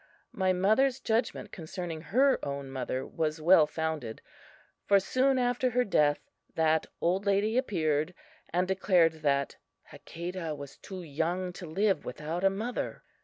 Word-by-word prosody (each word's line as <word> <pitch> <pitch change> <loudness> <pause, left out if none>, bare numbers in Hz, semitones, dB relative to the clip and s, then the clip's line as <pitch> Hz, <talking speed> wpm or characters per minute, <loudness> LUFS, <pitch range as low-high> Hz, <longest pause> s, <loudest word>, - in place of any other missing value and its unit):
My 190 -1 +1
mother's 220 +9 +2
judgment 220 -2 -1
concerning 165 -1 -6
her 260 - +2
own 140 -1 -4
mother 130 0 -3
was 155 0 -2
well 160 -1 +6
founded, 155 -7 -3 0.6
for 200 -1 +5
soon 260 +7 +2
after 245 0 +1
her 250 +1 +2
death 150 -9 +2 0.3
that 160 -1 +2
old 185 +4 +1
lady 200 +3 +2
appeared, 170 - 0 0.3
and 180 +2 0
declared 175 -4 +2
that 140 -2 0 0.3
Hakadah 170 -2 -6
was 140 -1 -9
too 190 -2 -8
young 170 +4 -2
to 175 -1 -8
live 195 +5 +1
without 160 +4 -4
a 195 - +6
mother. 220 +6 -4
180 Hz, 140 wpm, -29 LUFS, 155-200 Hz, 0.6 s, well